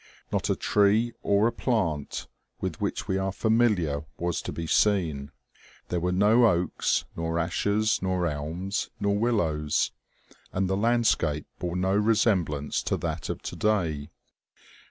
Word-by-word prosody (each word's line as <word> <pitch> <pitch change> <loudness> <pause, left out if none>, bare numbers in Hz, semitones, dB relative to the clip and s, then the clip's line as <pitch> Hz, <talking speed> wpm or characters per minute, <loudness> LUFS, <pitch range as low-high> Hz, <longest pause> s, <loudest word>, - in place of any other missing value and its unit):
Not - - -1
a - - +2
tree 105 +3 +2
or 100 +1 +3
a 120 - +3
plant 95 - -1 0.3
with - - -4
which - - -2
we 95 - 0
are 95 0 -1
familiar 100 -10 +1
was 85 0 -1
to - - -5
be 85 - -5
seen. 80 -7 +1 0.6
There 90 - 0
were 90 +2 0
no 105 +6 +5
oaks, 90 -3 +1
nor 80 0 -2
ashes, 100 +6 +1
nor 95 -1 0
elms, 85 +6 -3
nor 100 0 +1
willows, 85 -10 +1 0.6
and 95 0 0
the 95 - 0
landscape 105 -9 +1
bore 90 -1 -3
no 95 +2 +1
resemblance 100 -9 +1
to - - -1
that - - -4
of - - -4
today. 85 -9 -1
95 Hz, 140 wpm, -27 LUFS, 80-105 Hz, 0.6 s, no